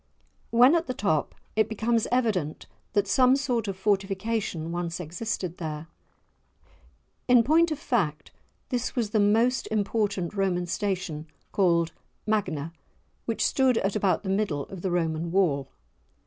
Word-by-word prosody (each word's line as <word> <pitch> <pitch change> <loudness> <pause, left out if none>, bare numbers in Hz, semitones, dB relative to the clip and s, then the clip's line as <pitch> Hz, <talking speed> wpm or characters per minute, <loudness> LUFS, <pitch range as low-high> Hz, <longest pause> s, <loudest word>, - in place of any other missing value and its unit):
When 245 +5 +6
at 335 -2 +1
the 255 - -3
top, 160 -9 0 0.2
it 220 0 +2
becomes 225 +1 0
evident 210 -12 0 0.3
that 205 -1 +2
some 255 +5 +5
sort 245 -5 -1
of 195 -2 -3
fortification 195 -3 -1
once 175 0 -3
existed 180 +1 -4
there. 155 -1 -5 1.4
In 245 -2 +6
point 325 +6 +4
of 310 - -2
fact 190 - -1 0.4
this 245 -2 -2
was 230 -5 -1
the 220 +4 +3
important 205 -4 -1
Roman 190 -3 0
station 175 -4 -3 0.2
called 170 -4 +2 0.3
"Magna" 175 -8 -1 0.5
which - - 0
stood 260 -4 +3
at 195 -1 0
about 200 -2 +1
the 190 - -4
middle 190 -8 0
of 190 -3 -8
the 190 - -1
Roman 165 -1 -1
Wall. 150 -8 +1
200 Hz, 135 wpm, -27 LUFS, 170-230 Hz, 1.4 s, When